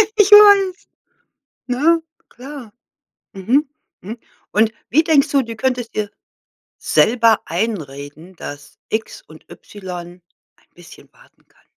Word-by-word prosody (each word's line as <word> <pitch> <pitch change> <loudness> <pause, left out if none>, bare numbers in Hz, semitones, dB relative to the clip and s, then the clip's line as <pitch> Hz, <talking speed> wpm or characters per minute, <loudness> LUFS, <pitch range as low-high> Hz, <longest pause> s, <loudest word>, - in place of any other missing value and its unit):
ich 415 -1 +3
weiß. 405 -2 +6 0.8
Ne? 320 +7 +2 0.3
Klar. 255 -3 -11 0.6
Mhm. 255 +10 0 0.3
Mhm. 220 +5 -8 0.3
Und 220 +1 +2 0.2
wie 315 +6 +4
denkst 305 -2 +3
du, 275 -2 +2
du 230 -2 -8
könntest 245 -1 -2
dir 210 -1 -3 0.7
selber 230 -1 +3
einreden, 165 -3 -5
dass 145 -3 -10
X 220 - -4
und - - -18
Y 180 -3 -10 0.4
ein - - -32
bisschen - - -16
warten - - -26
kann? - - -31
230 Hz, 115 wpm, -18 LUFS, 190-295 Hz, 0.8 s, weiß